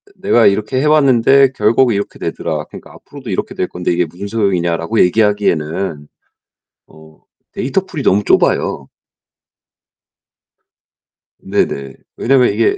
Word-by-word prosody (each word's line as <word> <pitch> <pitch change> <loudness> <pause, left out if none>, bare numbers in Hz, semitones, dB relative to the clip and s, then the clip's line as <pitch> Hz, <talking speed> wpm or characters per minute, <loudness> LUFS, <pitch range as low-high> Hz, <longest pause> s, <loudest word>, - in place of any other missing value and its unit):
"내가 120 -2 +2
이렇게 105 +6 0
해왔는데 140 -2 +4
결국 115 +4 +3
이렇게 100 0 -4
되더라. - - -4
그러니까 - - -13
앞으로도 - - -12
이렇게 - - -4
될 90 - -2
건데 90 0 -3
이게 90 0 +1
무슨 90 +5 -9
소용이냐."라고 95 -2 0
얘기하기에는 90 -6 0 0.8
어 80 0 -18 0.3
데이터 180 +9 -2
풀이 155 -6 -6
너무 105 -3 +2
좁아요. 70 -7 +1 2.5
네 - - 0
네. 70 -1 -7 0.2
왜냐면 125 0 +2
이게 400 0 +1
105 Hz, 305 characters per minute, -15 LUFS, 85-130 Hz, 2.5 s, 해왔는데